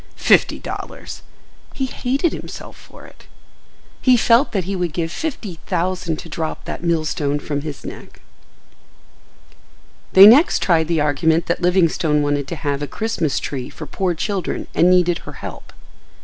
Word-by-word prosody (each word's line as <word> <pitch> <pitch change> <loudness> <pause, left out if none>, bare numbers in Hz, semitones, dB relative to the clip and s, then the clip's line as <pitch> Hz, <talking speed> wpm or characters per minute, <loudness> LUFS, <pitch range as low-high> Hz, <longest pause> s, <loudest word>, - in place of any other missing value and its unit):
—Fifty - - +3
dollars! - - -8 0.5
He 270 - -1
hated 270 +5 -1
himself - - -8
for - - -15
it. - - -18 0.7
He 255 -2 +5
felt 235 +4 +3
that 195 -5 -1
he 195 +3 -3
would 175 -4 -2
give 165 -1 -2
fifty 210 - -5
thousand 180 -2 -1
to - - -9
drop 160 -1 -5
that - - -6
millstone 155 -4 0
from 145 0 -4
his 150 -2 -7
neck. - - -10 1.9
They 190 +1 +10
next 255 +10 +6
tried 160 -3 +2
the 165 -2 +1
argument 160 +3 +1
that 175 - -2
Livingstone 170 -4 +2
wanted 145 -1 -1
to 170 - -4
have 145 -2 -3
a 145 - -3
Christmas 180 -4 -2
tree 130 -3 -5
for 155 - -9
poor 180 +4 -2
children 190 +1 -3
and 175 - +4
needed 180 -2 +3
her - - -10
help. - - -9
170 Hz, 155 wpm, -20 LUFS, 155-190 Hz, 1.9 s, They